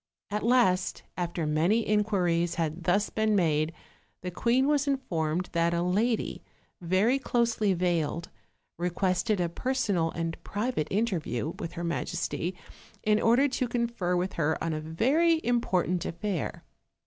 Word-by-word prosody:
At 210 +1 -1
last, 225 -6 +2
after 175 -2 -2
many 170 +9 +2
inquiries 180 -5 +1
had 165 +1 -2
thus 200 +4 +2
been 220 -1 +1
made, 155 -4 +2 0.5
the 180 - -3
queen 245 +8 +2
was 290 -1 +2
informed 180 - -1
that 170 0 +1
a 170 - +1
lady, 215 +6 0 0.4
very 190 +10 +2
closely 230 -6 +1
veiled, 170 -1 -1 0.5
requested 185 +4 0
a 175 - +1
personal 200 -4 0
and 165 0 -4
private 205 -7 -2
interview 170 - -1
with 165 - -5
her 170 -1 -5
majesty, 170 +1 -2 0.5
in 215 0 +3
order 245 +5 +4
to 255 -1 -1
confer 235 -7 -1
with 180 +2 -1
her 160 -1 0
on 165 -1 -2
a 155 - -3
very 265 - +2
im 245 -7 +1
portant 180 -4 0
affair. 185 -1 -3
185 Hz, 140 wpm, -28 LUFS, 170-230 Hz, 0.5 s, order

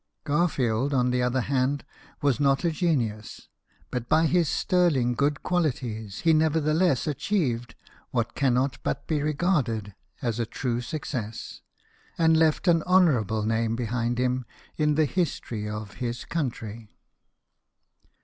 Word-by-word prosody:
Garfield, 140 -5 +1
on 125 -1 +2
the 125 0 +1
other 125 +1 +1
hand, 135 +2 0 0.4
was 140 -2 +2
not 140 0 +2
a 170 - +3
genius; 125 - -2 0.4
but 125 -2 -4
by 160 +1 +4
his 170 -1 +2
sterling 155 -10 +2
good 140 +3 0
qualities 120 - -2
he 165 -1 +4
nevertheless 155 -1 +2
achieved 140 - -1 0.3
what 115 -3 -1
cannot 130 +1 +1
but - - -3
be 155 -2 0
regarded 140 - 0 0.3
as 120 -1 -2
a 115 - +1
true 120 +1 -2
success, 120 -5 -5 0.6
and 160 -1 +4
left 160 +3 +2
an 165 -2 +5
honourable 130 - +3
name 115 +1 0
behind 120 0 -1
him 125 0 0 0.3
in 150 -1 +2
the 155 0 +3
history 125 - -2
of 105 -1 -6
his 120 -1 -3
country. 115 -8 -4
130 Hz, 130 wpm, -26 LUFS, 115-155 Hz, 0.6 s, an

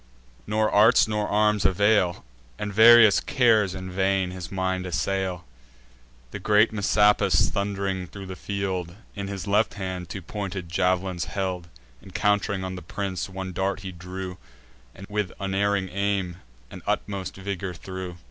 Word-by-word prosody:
Nor 110 +1 +1
arts 105 +2 +5
nor 105 -1 -1
arms 105 0 +2
avail; 95 - +2 0.3
And 105 -1 -4
various 110 -2 +8
cares 110 -7 +2
in 95 0 -6
vain 95 0 +1
his 90 -2 -7
mind 95 -1 -1
assail. 90 +2 -2 0.9
The - - -6
great 105 +1 +3
Messapus, 105 0 +3
thund'ring 100 -2 -2
thro' 100 +2 -9
the 95 0 -7
field, 95 -3 -3 0.2
In 100 -1 -5
his 100 -2 -5
left 105 +2 +1
hand 95 -3 -5
two 95 - -6
pointed 95 -2 -5
jav'lins 90 0 0
held: 90 -1 -3 0.4
Encount'ring 100 0 0
on 95 0 -4
the 90 - -7
prince, 95 +3 -4
one 95 0 -6
dart 95 +2 -1
he 95 -2 -6
drew, 90 +1 -7 0.6
And 95 - -10
with 105 -3 -2
unerring 100 0 0
aim 100 -2 -1 0.3
and - - -9
utmost 100 -2 -2
vigour 95 -1 -4
threw. 95 -1 -7
95 Hz, 145 wpm, -25 LUFS, 90-100 Hz, 0.9 s, various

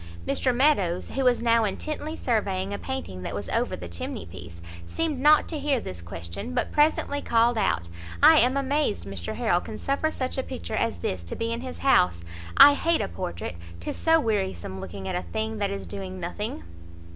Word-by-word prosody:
Mr 255 - +2
Meadows, 240 - +2
who 270 - -2
was 245 -2 +3
now 230 -1 +4
intently 305 +9 -3
surveying 200 -5 -1
a - - -4
painting 265 - -5
that - - -5
was - - -5
over - - 0
the 90 - -8
chimney 85 -1 -5
piece, 85 0 -11 0.3
seemed 310 - -1
not 300 +3 +5
to 315 - -4
hear 280 -2 +1
this 90 - -7
question, 85 +1 -7
but - - 0
presently 295 -1 +2
called 235 +1 +3
out 85 - 0 0.4
"I - - +9
am 250 +4 +4
amazed 275 - 0
Mr 95 -3 -3
Harrel 195 -8 +1
can 215 - -7
suffer 280 +3 0
such 260 -3 -3
a - - +2
picture 85 - -7
as - - 0
this 85 +1 -3
to 85 - -5
be 230 0 -2
in 235 - -4
his 255 0 -7
house. 90 - +3 0.3
I 290 - +10
hate 330 +3 +1
a - - -1
portrait, 85 0 -5 0.2
'tis 85 - -5
so 325 0 +4
wearisome 190 - -2
looking 95 +1 -7
at - - -2
a 180 - -1
thing 220 0 -2
that 200 -1 0
is 200 0 -5
doing 185 -2 -7
nothing!" 175 - -4
215 Hz, 200 wpm, -26 LUFS, -, 0.4 s, I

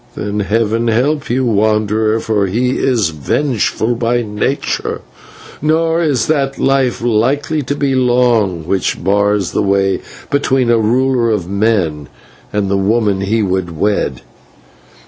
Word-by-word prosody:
Then 105 0 -3
Heaven 115 +3 0
help 135 +6 0
you, 130 +2 0
wanderer, 110 0 +1
for 105 -3 0
he 120 +6 0
is 115 -9 +1
vengeful 110 - -1
by 120 +1 0
nature, 105 +6 -2 0.6
nor 160 +2 +1
is 145 -7 +1
that 140 -3 0
life 135 -3 +1
likely 135 +7 +1
to 140 +1 -3
be 140 -2 0
long 120 -9 +2
which 95 0 -1
bars 100 -1 +1
the - - 0
way 100 -1 +1 0.3
between 135 -3 +1
a 115 - +3
ruler 120 +2 +1
of 105 -6 -1
men 95 - 0 0.4
and 105 -1 -1
the 100 0 0
woman 100 0 +1
he 110 +3 0
would 90 -4 -2
wed. 105 +4 -1
110 Hz, 135 wpm, -15 LUFS, 100-130 Hz, 0.6 s, a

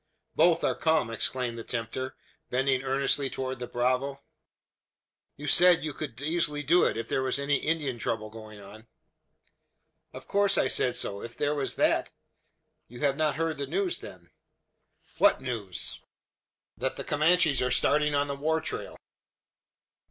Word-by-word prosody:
"Both 170 -1 +4
are - - +2
come!" 160 -8 +1
exclaimed 120 +1 -1
the - - -6
tempter, 125 +3 -4 0.3
bending 130 0 +1
earnestly 135 +1 +1
towards 130 -1 -4
the 125 - -5
bravo. 130 +3 -1 1.2
"You 145 - -8
said 175 +4 +6
you 155 -2 -3
could 135 -5 -7
easily 150 -1 0
do 170 +6 +4
it, - - 0
if 115 0 -4
there - - 0
was 130 0 0
any 140 0 +1
Indian 150 -5 -2
trouble 110 -1 -3
going 110 -1 -11
on?" 110 +3 -13 1.2
"Of - - -11
course 200 0 +2
I - - +3
said 125 - +2
so. 100 0 -1
If 115 - -9
there 145 0 0
was 140 -2 -1
that - - +1 0.4
" - - -50
"You 120 +3 -11
have 140 -2 +2
not 155 0 0
heard 160 -1 -2
the 140 - -3
news, 185 +4 -1
then?" 90 -2 -12 0.9
"What - - +5
news?" 115 -8 -3 0.7
"That - - -3
the - - -5
Comanches 155 -2 +3
are 125 - +1
starting 150 +3 +2
on 145 0 +1
the 140 - -3
war 160 +3 0
trail." 160 - -6
135 Hz, 160 wpm, -28 LUFS, 120-150 Hz, 1.2 s, said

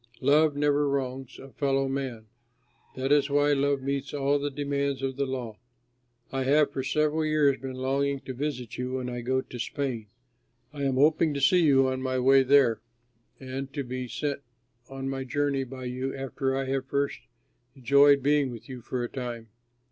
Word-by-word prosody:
Love 150 +2 +4
never 145 0 +2
wrongs 130 -2 -3
a 135 - -12
fellow 135 -1 0
man; 135 -5 -4 0.7
that 130 +1 -2
is 145 -1 +4
why 145 +1 +3
love 140 -1 +1
meets 140 +1 -3
all 140 0 +1
the 145 +1 -2
demands 140 -1 -2
of 135 -1 -2
the 140 0 -1
law. 120 -5 -5 0.7
I 135 - -1
have, 145 +2 +4
for 135 - -3
several 155 +3 +1
years, 150 -3 +2
been 130 -1 -6
longing 135 +2 0
to 130 - -6
visit 125 -3 -4
you 125 0 -3
when 125 -1 -3
I 120 0 -4
go 130 +2 0
to 125 - -10
Spain. 120 -3 -3 0.7
I 140 -1 -3
am 135 -1 +1
hoping 150 +2 +3
to - - -1
see 175 +6 +4
you 135 -4 +4
on 130 0 -2
my 130 0 -1
way 135 +2 +5
there, 130 -5 +4 0.6
and 135 +1 -6
to 140 -2 -2
be 130 0 -5
sent 140 +3 -3 0.5
on 135 0 -5
my 135 0 -3
journey 140 +1 0
by 130 0 -8
you 130 +2 -3
after 135 0 -2
I 135 - -1
have 135 0 -2
first 140 +1 -1 0.6
enjoyed 140 +1 +5
being 145 -1 +3
with 115 -2 -9
you 130 -2 -8
for 125 +1 -3
a - - -2
time. 120 -3 -6
135 Hz, 185 wpm, -27 LUFS, 130-140 Hz, 0.7 s, way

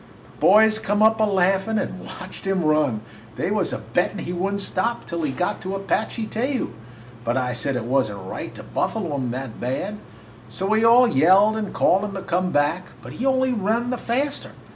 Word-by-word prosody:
"The - - -21
boys 220 +1 +5
come 205 0 +1
up 220 0 +4
a - - +5
laughin' 195 +2 +1
and 185 - -3
watched 185 +1 -9
him 190 -2 +1
run. 150 -8 +2 0.3
They - - -2
was - - 0
a - - -2
bettin' - - -1
he 175 - -4
would 190 +3 -1
n't - - -2
stop 235 +4 -2
till 170 0 -4
he 150 -3 -1
got 180 +8 -2
to 190 +1 -4
Apache 220 +3 -1
Teju, 250 +5 -2 0.5
but 120 +1 0
I 125 -1 0
said 125 +3 -2
it 125 - -2
was 130 -1 +2
n't 100 - -7
right - - -6
to - - -9
buffalo 175 -10 -2
him 130 -2 -2
that 130 -1 -6
bad. 185 +12 -3 0.5
So 150 +12 -4
we 220 +2 +2
all 240 +2 +7
yelled 190 - +5
and 215 -2 -3
called 190 +3 +3
him 205 -1 -4
to 190 - -5
come 180 -1 0
back, 150 +5 +1 0.2
but - - -9
he 255 - -2
only 260 -1 +2
run 230 +3 0
the 250 - -2
faster. 275 +5 -2
195 Hz, 210 wpm, -23 LUFS, 155-220 Hz, 0.5 s, all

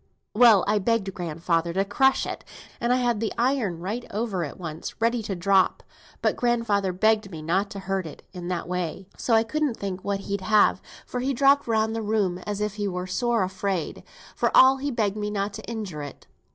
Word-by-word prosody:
"Well, 220 -4 +6
I 210 0 +2
begged 200 -1 0
grandfather 170 0 -1
to 195 +2 +1
crush 265 +7 +2
it, - - -6 0.4
and 235 +1 0
I - - +5
had 240 -3 +1
the 225 -1 -1
iron 235 -8 0
right 215 +7 -3
over 205 -4 -2
it 150 - -6
once, 160 -3 -7
ready 230 +1 +1
to 205 -2 -4
drop, 190 +1 +2 0.4
but - - +2
grandfather 230 -5 +1
begged 215 +2 +2
me 160 -4 -8
not 190 +5 0
to 200 - -7
hurt 190 -2 -2
it 155 - -11
in 175 -2 -7
that 180 -2 -3
way. 180 +1 -4
So 230 - +1
I 225 - +5
couldn't 280 +1 -1
think 190 -2 -5
what 200 -1 -2
he'd 200 0 -3
have, 215 +1 +3 0.2
for 250 - -4
he 265 +2 -1
hopped 280 +2 +4
round 220 0 +1
the 225 - -2
room 205 -4 0
as 205 0 -3
if 210 0 -2
he 205 -1 -1
were 180 -1 -3
sore 230 +4 0
afraid, 190 -2 -3 0.3
for - - +1
all 265 +1 +7
he 280 +2 -2
begged 215 -5 -1
me 210 0 -2
not 200 0 -2
to - - -8
injure 205 -10 -5
it. 145 -2 -9
205 Hz, 210 wpm, -25 LUFS, 185-230 Hz, 0.4 s, all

